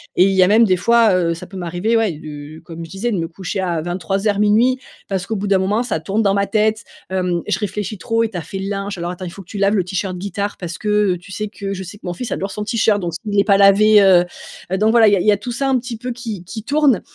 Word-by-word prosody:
et - - +5
il 195 - +3
y 190 -1 +4
a - - +4
même 220 +4 +5
des 185 -5 +3
fois, 230 +2 +4
heu, 170 -2 +1
ça 165 - -8
peut 195 - -10
m'arriver, 180 +6 0
ouais, 220 -5 +1
de 150 0 -9
comme 165 0 -8
je - - -14
disais 205 +7 -3
de 205 - -1
me 165 -1 -2
coucher 190 +3 -5
à, 175 -4 -1
23:00-00:00. 205 +7 +1 0.3
Parce 190 -2 -2
qu'au 225 - -2
bout 205 0 -3
d'un 195 -1 +3
moment 205 +5 0
ça 240 -9 -2
tourne 195 +7 -1
dans 200 -3 +2
ma 200 0 +1
tête, 215 -1 +1 0.2
hem, 180 -2 -1
je - - 0
réfléchis 210 0 -4
trop: 225 +4 0
«Et 225 - -1
tu 190 - -6
as - - -3
fait 170 +5 -7
le 195 +1 -4
linge? 200 -1 -4
Alors 175 0 -3
attends, 180 +1 -7
il - - -5
faut 195 - -10
que 180 - -17
tu 205 - -7
laves 200 +1 +2
le 190 - +2
tee-shirt 185 +1 -3
guitare 200 +2 -3
parce 175 -1 -6
que, 210 - -7 0.3
heu, - - -7
tu 180 +3 -13
sais 210 +1 -4
que», 200 -2 -5
je 190 -1 -5
sais 185 +3 -10
que - - -16
mon 175 - -3
fils 240 +7 -6
adore 195 +1 -3
son 210 +2 -4
tee-shirt, 215 -2 +1
donc 175 -1 -3
s'il 205 -1 -2
est 200 - +5
pas 200 -1 +4
lavé, 205 +2 +6
heu 185 -3 +6 0.5
heu, 190 - +1
donc 215 +2 +3
voilà, 225 -2 +6
il - - +2
y - - +4
a - - 0
il 180 - -2
y 210 - +7
a 205 - 0
tout 225 +4 -6
ça 275 +3 -1
un 265 -1 +3
petit 245 -1 -5
peu 250 +3 -5
qui 225 -7 -7
qui 215 +4 -7
tourne, 280 -3 +2
200 Hz, 310 wpm, -19 LUFS, 180-215 Hz, 0.5 s, y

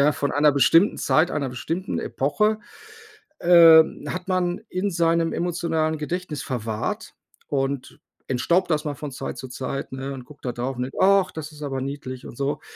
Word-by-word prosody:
ja, 145 +2 +4
von 145 - -2
einer 150 0 +4
bestimmten 155 - +4
Zeit, 160 +3 +2
einer 140 -3 -1
bestimmten 165 +9 -3
Epoche 210 +11 0 0.8
äh, 165 -2 +8 0.3
hat 180 0 -5
man 180 -2 0
in 190 +2 -1
seinem 165 -1 +1
emotionalen 160 -2 -1
Gedächtnis 160 0 -4
verwahrt 110 -4 -4 0.3
und 135 -1 -2 0.3
entstaubt 170 +9 +1
das 155 0 0
mal 145 - -2
von 145 0 -6
Zeit - - -6
zu 130 - -8
Zeit, 130 +1 -5
ne, 135 +1 -5
und 130 -2 -8
guckt 145 +2 -16
da 125 - 0
drauf 130 +2 -3
und 125 - -1
denkt: 130 - -7
„Ach, 195 -1 +5
das 160 -1 -7
ist 150 0 -14
aber 135 -2 -3
niedlich“ 130 -2 -6
und - - -10
so. 140 +1 -2
150 Hz, 180 wpm, -24 LUFS, 135-170 Hz, 0.8 s, äh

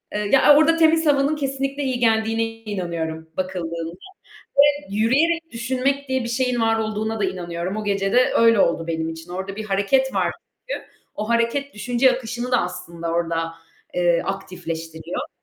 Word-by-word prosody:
Eee, 210 -1 -1
ya, 290 +2 +7
o - - +6
orada 325 +1 +4
temiz 325 0 +4
havanın 285 0 +3
kesinlikle 275 0 -2
iyi 260 -2 -1
geldiğine 225 -1 +2 0.2
inanıyorum 170 -6 -4
bakıldığında 170 -3 -3 0.7
ve 290 0 +4
yürüyerek 325 +9 +2
düşünmek 260 +4 -1
diye 260 -1 0
bir 235 - -4
şeyin 250 0 0
var 225 0 +2
olduğuna 220 0 -2
da - - +2
inanıyorum. 180 0 -3
O 215 - -3
gece 195 -1 0
de 250 +1 +4
öyle 230 -1 +5
oldu 165 -2 +2
benim 160 -1 -2
için. 165 +1 -8
Orada 190 +2 -5
bir 220 - -4
hareket 215 +7 +1
var - - +1 0.4
çünkü. - - -3 0.3
O 215 +2 -4
hareket 235 +5 0
düşünce 245 +5 +2
akışını 240 0 -5
da 245 - +5
aslında 170 -1 -6
orada, 165 -1 -1 0.4
eee, 175 -1 +2
aktifleştiriyor. 165 -4 -5
220 Hz, 165 wpm, -22 LUFS, 175-260 Hz, 0.7 s, ya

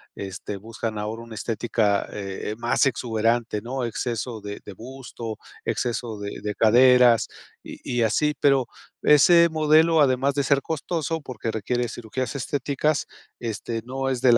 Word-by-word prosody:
este, 100 +1 -6
buscan 110 +1 -5
ahora 110 +2 -4
una 115 -1 -10
estética, 110 -2 0
eh 100 0 -5
eh, - - -4
más 120 +4 +2
exuberante, 115 -2 0
¿no? 125 +2 -4
Exceso 115 0 -3
de 100 0 -7
de 100 - -8
busto, 120 -1 -8 0.3
exceso 120 -2 -2
de 100 0 -6
de 105 -1 -3
caderas 120 +2 +5 0.4
y - - -10 0.2
y - - +3
así. 150 +7 +2
Pero, 135 -3 +3 0.4
ese 170 +3 +7
modelo, 160 +1 +4
además 135 0 +3
de 140 - 0
ser 140 0 +2
costoso 160 +1 -2
porque, 115 -4 -5
requiere 120 +3 -1
cirugías 120 +5 -4
estéticas, 140 +2 -1 0.3
este 115 0 -4
no 135 +2 -3
es 130 -2 -2
del 120 -2 +6
120 Hz, 150 wpm, -24 LUFS, 110-135 Hz, 0.4 s, ese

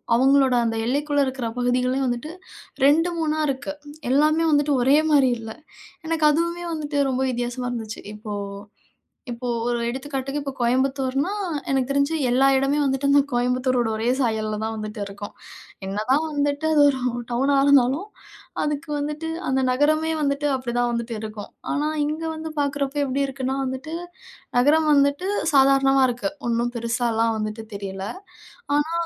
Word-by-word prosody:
அவங்களோட 265 +1 +4
அந்த 225 - -1
எல்லைக்குள்ள 285 +3 +1
இருக்கிற 260 -2 -3
பகுதிகளையும் 250 +2 +1
வந்துட்டு 245 +6 -3 0.5
2, 325 +5 +4
3ஆ 310 -1 0
இருக்கு. 280 +1 -3 0.4
எல்லாமே 305 +4 +3
வந்துட்டு 290 0 +3
ஒரே 275 +3 +5
மாரி 275 -3 +5
இல்ல. 225 -1 -7 0.5
எனக்கு 320 -1 +2
அதுவுமே 340 +3 -1
வந்துட்டு 300 -2 -3
ரொம்ப 260 0 0
வித்தியாசமா 245 +1 -3
இருந்துச்சு. 225 -2 -5
இப்போ 210 0 -7 1.0
இப்போ 240 +1 -4 0.2
ஒரு 240 0 0
எடுத்துக்காட்டுக்கு, 275 +2 -4
இப்போ 280 -1 -4
கோயம்புத்தூர்னா 265 +5 +1 0.4
எனக்கு 265 -1 +1
தெரிஞ்சு, 280 +3 +1 0.2
எல்லா 265 +2 +4
இடமே 275 +2 +1
வந்துட்டு 270 0 0
அந்த 285 0 +6
கோயம்புத்தூரோட 250 0 +1
ஒரே 225 +2 0
சாயல்ல 215 -3 -1
தான் 220 0 -2
வந்துட்டு 215 0 -6
இருக்கும். 205 +1 -8 0.5
என்னதான் 235 +10 +1
வந்துட்டு 290 +1 -1
அது 295 - +5
ஒரு 265 -2 -1 0.3
டவுனா 270 +4 +2
இருந்தாலும், 280 +6 +4 0.6
அதுக்கு 300 +1 -3
வந்துட்டு 300 +2 -3 0.2
அந்த 265 0 +2
நகரமே 310 +4 +2
வந்துட்டு 280 +1 0
அப்படிதான் 245 -1 -1
வந்துட்டு 235 -1 -3
இருக்கும். 215 -1 -7 0.2
ஆனா, 300 +1 0 0.2
இங்க 310 +2 -3
வந்து 315 0 -6
பார்க்குறப்போ 285 0 -1
எப்படி 270 +1 -1
இருக்குன்னா 265 0 -3
வந்துட்டு, 260 +5 -5 0.6
நகரம் 305 +5 +4
வந்துட்டு 285 +6 +2 0.2
சாதாரணமா 270 0 +5
இருக்கு. 245 +5 -3 0.2
ஒண்ணும் 235 +1 0
பெருசாலாம் 230 -1 0
வந்துட்டு 215 +1 -4
தெரியல. 195 -1 -5 0.7
ஆனா 295 +3 +1
270 Hz, 140 wpm, -23 LUFS, 240-290 Hz, 1.0 s, அந்த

